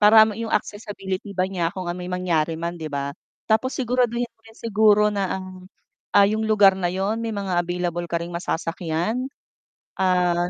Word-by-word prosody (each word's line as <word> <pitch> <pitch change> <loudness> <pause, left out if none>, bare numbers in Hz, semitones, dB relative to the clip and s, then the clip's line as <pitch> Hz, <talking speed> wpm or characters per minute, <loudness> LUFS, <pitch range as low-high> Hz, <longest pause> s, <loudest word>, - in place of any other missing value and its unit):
para 210 +1 +7 0.2
yung 225 -1 -4
accessibility 205 -2 -3
ba 185 -1 0
niya 175 -3 -1
kung, 185 -2 -5
ah, 175 - -2
may 180 0 -6
mangyari 165 -3 0
man, 170 +1 -3
'di 160 -2 -5
ba? 140 0 -3 0.3
Tapos 225 +4 +2
siguraduhin 245 -1 0
mo - - -57
rin 225 0 -17
siguro 210 -1 +4
na 200 -2 -1 0.2
ang, 185 - -8 0.7
ah, 200 -1 +6
'yong 215 +1 0
lugar 205 -3 +5
na 175 -2 -1
yun 195 +4 0
may 225 - -2
mga 195 -3 -2
available 175 0 -2
ka 170 0 -2
ring 170 - -5
masasakyan, 170 +6 -2 0.8
ah, 180 -1 +2
190 Hz, 175 wpm, -23 LUFS, 175-215 Hz, 0.8 s, para